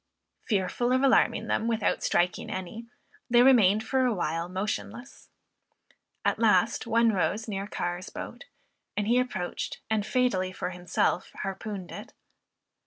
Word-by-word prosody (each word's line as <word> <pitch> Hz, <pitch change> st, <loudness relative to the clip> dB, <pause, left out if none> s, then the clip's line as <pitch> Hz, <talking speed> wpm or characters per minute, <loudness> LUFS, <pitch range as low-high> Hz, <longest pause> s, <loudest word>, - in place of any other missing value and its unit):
Fearful 210 Hz, +4 st, 0 dB
of 260 Hz, +1 st, +2 dB
alarming 270 Hz, -, +3 dB
them 225 Hz, -, 0 dB
without 225 Hz, -2 st, 0 dB
striking 175 Hz, 0 st, 0 dB
any, 190 Hz, +5 st, -6 dB, 0.4 s
they 240 Hz, 0 st, +6 dB
remained 220 Hz, -5 st, +5 dB
for 260 Hz, +2 st, +1 dB
a 250 Hz, -, +2 dB
while 165 Hz, -1 st, -2 dB
motionless. 215 Hz, +6 st, -5 dB, 1.0 s
At -, -, +1 dB
last 220 Hz, +1 st, +3 dB
one 230 Hz, 0 st, +4 dB
rose 215 Hz, +3 st, -1 dB
near 200 Hz, -1 st, -3 dB
Carr's 175 Hz, -2 st, -4 dB
boat, -, -, -8 dB, 0.5 s
and 205 Hz, 0 st, 0 dB
he 240 Hz, +2 st, +4 dB
approached, 250 Hz, -8 st, -3 dB
and 215 Hz, -2 st, +2 dB
fatally 200 Hz, -6 st, +1 dB
for 185 Hz, -, -4 dB
himself, 180 Hz, 0 st, -1 dB
harpooned 195 Hz, -1 st, -5 dB
it. -, -, -9 dB
210 Hz, 135 wpm, -28 LUFS, 185-235 Hz, 1.0 s, they